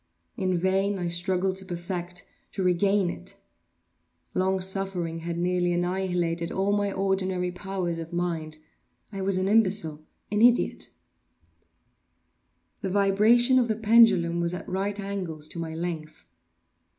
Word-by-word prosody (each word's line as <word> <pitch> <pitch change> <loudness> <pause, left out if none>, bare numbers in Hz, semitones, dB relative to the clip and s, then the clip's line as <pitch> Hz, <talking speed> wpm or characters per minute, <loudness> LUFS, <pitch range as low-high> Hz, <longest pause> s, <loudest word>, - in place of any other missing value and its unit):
In 185 -2 0
vain 195 +3 +1
I 175 -2 -2
struggled 185 +2 0
to 190 - -6
perfect—to 180 +1 -6
regain 185 +1 +2
it. 190 +3 -8 1.0
Long 190 +1 +1
suffering 185 -3 0
had 170 +1 -4
nearly 175 0 +1
annihilated 175 -2 -1
all 195 +1 0
my 205 -1 +1
ordinary 190 -2 0
powers 180 -2 -3
of 165 0 -7
mind. 165 -3 -3 0.5
I 195 -2 -5
was 190 0 0
an 185 +1 0
imbecile—an 200 -2 0
idiot. 240 +1 +3 1.9
The 195 - -2
vibration 215 +6 +4
of 245 - +2
the 220 - 0
pendulum 210 -7 +5
was 170 +1 -1
at - - -8
right 195 +2 -2
angles 185 -6 -4
to 170 - -5
my 160 -1 -4
length. 160 -2 -5
185 Hz, 125 wpm, -26 LUFS, 175-195 Hz, 1.9 s, pendulum